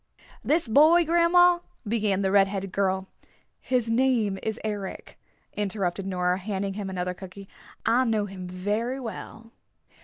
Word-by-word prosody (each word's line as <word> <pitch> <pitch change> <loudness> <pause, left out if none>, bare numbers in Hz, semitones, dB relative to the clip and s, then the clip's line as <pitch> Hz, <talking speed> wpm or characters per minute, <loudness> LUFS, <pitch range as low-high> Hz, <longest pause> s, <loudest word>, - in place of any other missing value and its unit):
"This 315 -1 +1
boy, 315 +8 +6
grandma," 345 +2 +5 0.3
began 205 -3 0
the 190 - +1
red 195 -1 +5
headed 195 -1 -4
girl. 190 -1 0 0.5
"His 250 -3 0
name 225 -4 +1
is 220 +1 -3
Eric," 205 -3 -5 0.4
interrupted 195 -2 -2
Nora, 180 -1 0
handing 195 0 -3
him 200 -1 -5
another 180 -1 -3
cookie. 190 +1 -11 0.4
"I 240 +3 +3
know 220 -3 +1
him 190 -2 -8
very 210 +8 -2
well." 230 -1 -8
205 Hz, 135 wpm, -26 LUFS, 190-235 Hz, 0.5 s, boy